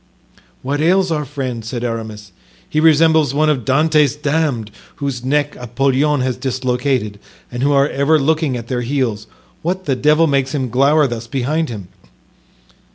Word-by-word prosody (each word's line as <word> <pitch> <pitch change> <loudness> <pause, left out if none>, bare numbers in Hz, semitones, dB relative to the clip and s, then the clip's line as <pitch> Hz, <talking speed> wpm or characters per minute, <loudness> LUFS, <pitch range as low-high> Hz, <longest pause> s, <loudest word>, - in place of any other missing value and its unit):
"What 145 +3 -2
ails 185 +2 +2
our 150 -2 -1
friend?" 130 -4 -5
said 120 +2 -5
Aramis, 110 -3 -5 0.4
"he 155 - -1
resembles 160 -2 +4
one 155 +1 +3
of 130 -5 -2
Dante's 150 +1 +2
damned, 145 -7 -1 0.2
whose 135 -4 -4
neck 145 +2 0
Apollyon 135 +4 0
has 125 -1 -1
dislocated 125 -4 -2 0.3
and 120 0 -5
who 140 +2 +2
are 140 0 +4
ever 145 +2 +2
looking 150 -2 0
at 115 -1 -8
their 125 0 -2
heels. 120 -4 -2 0.3
What 185 +3 -3
the 135 - 0
devil 150 +5 +3
makes 140 -1 0
him 130 -3 -2
glower 140 +5 +3
thus 120 -3 -4
behind 145 +6 -1
him?" 100 -6 -7
135 Hz, 160 wpm, -17 LUFS, 125-150 Hz, 0.4 s, resembles